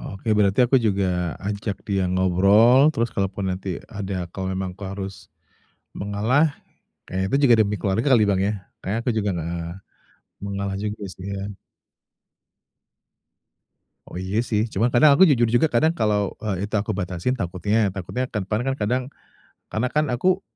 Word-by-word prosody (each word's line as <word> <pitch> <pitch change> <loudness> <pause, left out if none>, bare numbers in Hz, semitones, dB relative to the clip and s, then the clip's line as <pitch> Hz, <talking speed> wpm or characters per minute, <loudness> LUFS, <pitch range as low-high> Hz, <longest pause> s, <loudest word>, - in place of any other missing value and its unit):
Oke 95 - -11
berarti 100 +1 +2
aku 125 - +2
juga 100 -1 +1 0.4
ajak 100 0 -3
dia 100 -2 +1
ngobrol, 100 +7 +5
terus 120 -6 -1
kalaupun 100 0 -2
nanti 90 -1 -4
ada 95 -3 -4
kalau 95 0 -4
memang 95 0 -3
aku 100 - -11
harus 100 0 -5 0.9
mengalah, 105 +9 +1 0.6
kayaknya 95 +1 -2
itu 140 - +3
juga 120 -3 +6
demi 105 0 0
keluarga 100 +6 0
kali 115 -4 +5
Bang 95 -1 +1
ya, 105 - 0 0.3
kayaknya 105 +4 -2
aku 125 - +1
juga, 105 -1 0
eee, 85 +1 -4 0.7
mengalah 100 0 -3
juga, 105 0 -2
kasian. 100 +1 -6 2.5
Oh - - -11
iya 95 +4 -2
sih, 110 -3 0
cuman 110 +5 +1
kadang 145 +5 +6
aku 190 +5 +7
jujur 120 -6 +3
juga 120 +7 +3
kadang 155 +4 +2
kalau, 105 - 0
eee, 100 -3 -3
itu - - -21
aku 105 -1 -3
batasin 95 +5 -2
takutnya 100 +1 0
takutnya 100 +7 -4
ke 105 - -2
depan 105 +3 -1
kan 135 0 -1
kadang 125 +5 0 0.7
karena 115 +4 -1
kan 150 0 +2
aku, 180 +10 +1
100 Hz, 160 wpm, -23 LUFS, 95-115 Hz, 2.5 s, aku